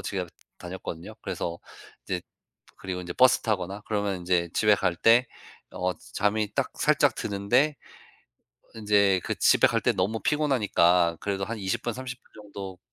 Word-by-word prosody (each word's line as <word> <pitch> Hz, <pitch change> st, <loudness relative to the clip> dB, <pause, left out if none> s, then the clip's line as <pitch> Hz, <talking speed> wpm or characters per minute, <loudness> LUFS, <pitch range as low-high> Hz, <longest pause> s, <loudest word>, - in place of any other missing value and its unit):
집에 95 Hz, -2 st, -3 dB, 0.3 s
다녔거든요. 90 Hz, -2 st, -7 dB
그래서 85 Hz, 0 st, -4 dB, 0.5 s
이제 90 Hz, -2 st, -3 dB, 0.5 s
그리고 90 Hz, -1 st, -5 dB
인제 90 Hz, -1 st, -6 dB
버스 130 Hz, 0 st, +5 dB
타거나 100 Hz, -2 st, -2 dB
그러면 100 Hz, -3 st, -1 dB
인제 85 Hz, -1 st, 0 dB
집에 105 Hz, -1 st, +4 dB
갈 85 Hz, -3 st, -1 dB
때 115 Hz, +5 st, +5 dB, 0.5 s
어 90 Hz, 0 st, -1 dB, 0.2 s
잠이 105 Hz, 0 st, 0 dB
딱 -, -, -1 dB
살짝 -, -, +2 dB
드는데 120 Hz, +9 st, +1 dB, 1.0 s
인제 100 Hz, -3 st, +3 dB
그 -, -, -2 dB
집에 -, -, +5 dB
갈 115 Hz, -, 0 dB
때 125 Hz, -, +3 dB
너무 100 Hz, +4 st, -1 dB
피곤하니까 95 Hz, -, +2 dB
그래도 100 Hz, -1 st, -2 dB
한 115 Hz, +2 st, -5 dB
20 105 Hz, +4 st, -2 dB
분, 120 Hz, -, -1 dB
30 125 Hz, -1 st, -7 dB
분 -, -, -29 dB
정도 100 Hz, -2 st, -8 dB
100 Hz, 290 characters per minute, -26 LUFS, 90-115 Hz, 1.0 s, 버스